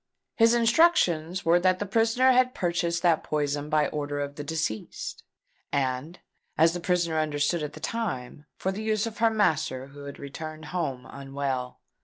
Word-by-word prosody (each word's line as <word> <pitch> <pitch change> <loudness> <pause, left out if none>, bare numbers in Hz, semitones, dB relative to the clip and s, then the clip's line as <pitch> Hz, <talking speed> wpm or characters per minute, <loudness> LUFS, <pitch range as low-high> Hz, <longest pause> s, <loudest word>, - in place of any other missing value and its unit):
His 230 +1 +5
instructions 225 - +3
were 170 +1 +5
that 185 +1 +3
the 205 - -3
prisoner 225 +5 +3
had 255 0 +3
purchased 170 -1 -1
that 170 -3 +3
poison 145 -1 -1
by 150 -1 +3
order 145 -1 -3
of 145 0 -3
the 145 - -6
deceased, 150 -8 -4 0.5
and, 140 +4 -1 0.4
as 165 +1 +5
the 175 - -3
prisoner 170 -2 +1
understood 150 +2 0
at 150 -1 -4
the - - -10
time, 150 - -4
for 190 - -1
the 200 +3 -5
use 215 -1 0
of 225 -2 -6
her 230 0 +5
master 155 -11 0
who 140 +1 -11
had 140 - -8
returned 155 +3 -7
home 135 -8 -2
unwell. 135 -2 -4
160 Hz, 170 wpm, -27 LUFS, 145-195 Hz, 0.5 s, His